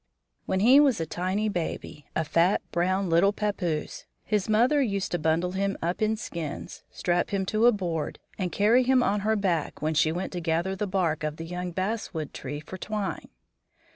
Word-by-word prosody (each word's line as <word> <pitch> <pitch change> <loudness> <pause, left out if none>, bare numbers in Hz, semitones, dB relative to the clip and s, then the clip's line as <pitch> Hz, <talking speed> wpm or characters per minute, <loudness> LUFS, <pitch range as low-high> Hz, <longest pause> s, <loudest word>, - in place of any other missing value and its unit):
When 190 - 0
he 255 +6 +7
was 275 -8 +4
a 165 - -1
tiny 185 +6 -1
baby, 160 -5 -4
a 160 - +1
fat, 170 +5 +2
brown, 185 +3 +1
little 170 +4 +4
pappoose, 195 -7 -2 0.2
his 210 -1 -1
mother 245 +7 +4
used 200 -6 -1
to 175 - 0
bundle 160 +3 +1
him 195 +1 -1
up 175 +4 -2
in 215 0 +2
skins, 165 -7 -6
strap 175 0 0
him 195 -1 -1
to 215 +4 +3
a - - +8
board, 175 -7 -3 0.2
and 185 -3 -2
carry 220 +5 +4
him 255 0 +3
on 205 -2 +1
her 215 +2 +1
back 180 -7 -1
when 155 +1 0
she 155 0 +3
went 180 +3 -3
to 180 - -2
gather 170 +3 0
the 205 +2 -2
bark 175 -5 0
of 150 -1 -2
the 165 - -6
young 180 +1 -4
basswood 185 -4 -3
tree 145 +2 -6
for 185 +5 -9
twine. 210 -1 -4
185 Hz, 195 wpm, -27 LUFS, 165-210 Hz, 0.2 s, a